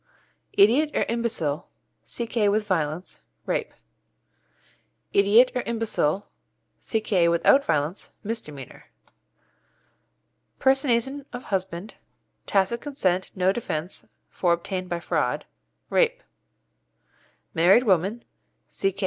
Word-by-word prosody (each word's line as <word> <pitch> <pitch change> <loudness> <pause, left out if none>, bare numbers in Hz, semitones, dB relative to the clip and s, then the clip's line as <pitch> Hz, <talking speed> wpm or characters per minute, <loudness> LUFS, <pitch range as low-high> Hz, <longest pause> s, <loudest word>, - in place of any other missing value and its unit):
Idiot 245 +10 +5
or - - +2
imbecile 215 -10 -2 0.4
C.K. 230 -3 0
with 210 +1 +1
violence 165 - -2 0.2
Rape. - - -1 1.4
Idiot 210 +6 +5
or 250 - 0
imbecile 220 -6 -1 0.5
C.K. 215 -6 +1
without 170 +11 +4
violence 150 - -1
Misdemeanour. 150 - -7 1.7
Personation 270 +1 +1
of 245 +1 -7
husband 190 0 -3
Rape. - - -46
Tacit 200 +4 +1
consent 190 -11 -1
no 185 0 +3
defence, 180 -5 -4 0.2
for 175 -2 +1
obtained 185 +1 -4
by 175 - -2
fraud. - - -1 0.5
Married 250 - -1
woman 200 +2 +1 0.5
C.K. 195 0 -2
200 Hz, 90 wpm, -25 LUFS, 175-235 Hz, 1.7 s, Idiot